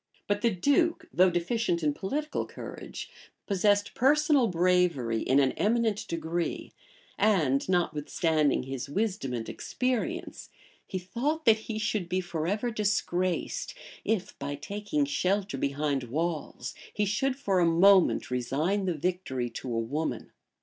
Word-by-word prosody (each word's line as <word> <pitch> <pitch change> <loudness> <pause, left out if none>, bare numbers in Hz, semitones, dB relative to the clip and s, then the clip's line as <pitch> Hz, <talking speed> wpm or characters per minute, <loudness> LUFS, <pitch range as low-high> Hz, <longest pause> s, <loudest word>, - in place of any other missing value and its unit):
[*] - - -35
But 205 0 0
the 235 - +4
duke, 285 - +1
though 185 +1 +5
deficient 175 0 0
in 150 -1 +2
political 295 - -3
courage, - - -8 0.3
possessed 205 +1 +2
personal 290 0 +4
bravery 175 - +2
in 135 +2 +3
an 135 -2 +3
eminent 220 -1 0
degree; 165 +1 -3 0.5
and 170 -9 +2
notwithstanding 155 -4 +1
his 135 0 -5
wisdom 195 - -1
and 115 -2 -3
experience, 255 +7 -3 0.4
he 190 - -3
thought 250 - -2
that 220 -2 +6
he 220 - -2
should 215 -4 -1
be 185 +1 +1
forever 185 +7 -2
disgraced, 185 -4 -1 0.3
if, 215 -4 -1
by 140 +1 -3
taking 200 -2 -2
shelter 185 +6 0
behind 140 -1 -1
walls, 155 -1 -3 0.2
he 210 - 0
should 255 +7 0
for 200 -9 0
a 175 - +4
moment 180 -2 +5
resign 150 +11 0
the 180 -3 0
victory 150 -7 -2
to 125 - -6
a 115 - -1
woman. 140 +8 -3
180 Hz, 135 wpm, -28 LUFS, 150-210 Hz, 0.5 s, that